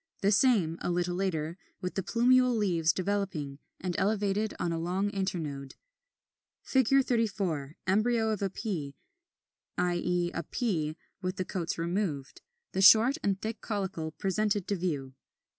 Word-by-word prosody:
The 200 - +4
same, 200 -8 +3
a - - -1
little 175 0 0
later, 170 -2 -2 0.2
with 180 - -4
the 195 - -1
plumule 250 +4 +3
leaves 170 -6 +2
developing, 185 -7 -2 0.2
and 180 -1 -3
elevated 205 +1 0
on 170 - 0
a 165 - -2
long 185 +4 -1
internode.] 165 -9 -3 0.9
[Illustration: 265 0 +3
Fig. - - -21
34. 195 - -1
Embryo 220 +4 +2
of 200 -3 -2
Pea, 155 - -4 0.8
i. 175 -1 +1
e. 175 -1 0
a 165 - -2
pea 160 -6 -2 0.3
with 185 0 -2
the 185 - -2
coats 170 -3 -3
removed; 170 -5 -2 0.3
the 190 - -1
short 225 +8 +7
and 195 -1 0
thick 220 +1 -5
caulicle 190 -7 -3
presented 205 0 0
to 200 - +1
view. 150 -8 -3
190 Hz, 145 wpm, -30 LUFS, 170-210 Hz, 0.9 s, short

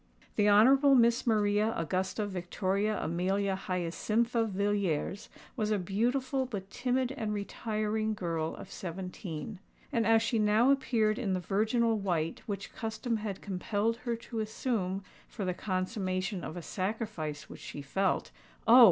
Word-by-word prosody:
The 210 0 +4
Honourable 265 +7 +7
Miss 235 0 +4
Maria 210 0 +3
Augusta 185 +5 -1
Victoria 195 +2 -1
Amelia 190 +3 0
Hyacintha 215 +6 0
Villiers 200 -3 -1 0.3
was 215 -4 0
a 215 - +2
beautiful, 250 +8 0
but 195 -5 -6
timid 255 0 0
and 220 -6 -2
retiring, 215 +1 -1
girl 165 -4 -2
of - - -10
seventeen;—and 190 - -5
as 225 0 +5
she 230 -2 +1
now 215 +5 +4
appeared 235 -5 +2
in 205 -6 0
the 185 - 0
virginal 220 +5 +1
white 170 -5 -1
which 200 -2 -4
custom 225 +1 -2
had 210 -3 -5
compelled 205 +3 -1
her 240 -1 -2
to 230 0 -6
assume 210 -3 -1 0.2
for 205 - -5
the 180 - 0
consummation 185 -1 -2
of 155 - -5
a 175 - -6
sacrifice 190 -7 -3
which - - -11
she 145 - -7
felt—Oh! 195 - +2
210 Hz, 135 wpm, -31 LUFS, 185-225 Hz, 0.3 s, Honourable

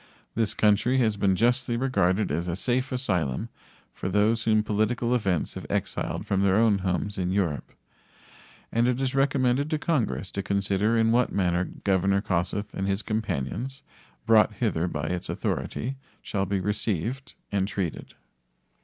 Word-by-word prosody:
This 110 -2 0
country 110 +5 +3
has 110 -5 +2
been 100 -2 +2
justly 120 +3 +1
regarded 105 - +1
as 85 +4 -1
a 85 - -1
safe 125 +6 -1
asylum 90 - -1 0.4
for 95 - -4
those 105 +4 +2
whom 110 -1 +3
political 110 +3 0
events 95 -9 0
have - - -7
exiled - - -2
from 100 -1 +1
their 100 -1 +3
own 110 -2 +4
homes 95 +2 -2
in 90 -1 0
Europe. 90 -7 -1 1.0
and 115 +1 +2
it 125 0 +1
is 135 -1 0
recommended 135 0 +2
to 155 - +1
Congress 145 - -1
to 100 - -2
consider 100 +3 +1
in 115 0 +3
what 125 +1 +3
manner 90 -2 +1 0.2
Governor 100 0 +2
Kossuth 95 +3 -1
and 95 - -2
his 100 +2 -1
companions, 110 - -3 0.4
brought 110 -1 +5
hither 100 -6 0
by 75 -4 -3
its 90 +2 -3
authority, 130 +4 -3 0.3
shall 100 -2 -2
be 100 0 0
received 105 - -2 0.2
and 100 -1 +1
treated. 95 -6 -4
105 Hz, 155 wpm, -26 LUFS, 95-120 Hz, 1.0 s, brought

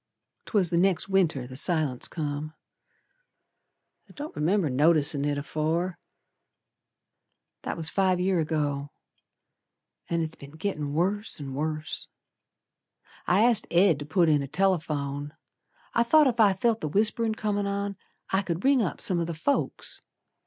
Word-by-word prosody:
'Twas 195 -6 +1
the 170 - +2
next 190 -1 +2
Winter 170 -9 +1
the 130 +1 -10
silence 150 -4 0
come, 150 0 -4 1.5
I - - -15
don't 295 +2 -7
remember 165 +4 +1
noticin' 145 +1 +3
it 145 -1 -1
afore. 160 +5 -2 1.6
That - - -4
was 160 -2 +3
five 185 -2 +2
year 185 -1 +1
ago, 145 -3 -1 1.2
An' 170 -1 0
it's 160 0 -5
been 140 +1 -13
gittin' 155 -6 -3
worse 200 +5 -1
an' 135 -2 -6
worse. 155 +2 -3 1.2
I 195 +4 +4
asked 235 -2 +3
Ed 175 -3 +4
to 145 - -6
put 170 +2 +3
in 150 -2 +3
a 140 - -4
telephone. 150 -5 -1 0.6
I 230 - +3
thought 300 +6 +5
ef 240 -2 -1
I 205 -3 +6
felt 225 +4 0
the 155 - -2
whisperin' 220 +4 +1
comin' 205 -2 -1
on 200 0 -2 0.4
I 190 - +2
could 175 -2 -4
ring 270 -2 +4
up 190 - -2
some 185 -6 +1
o' 170 - 0
th' 165 -1 -5
folks. 280 - -1
170 Hz, 145 wpm, -27 LUFS, 150-200 Hz, 1.6 s, I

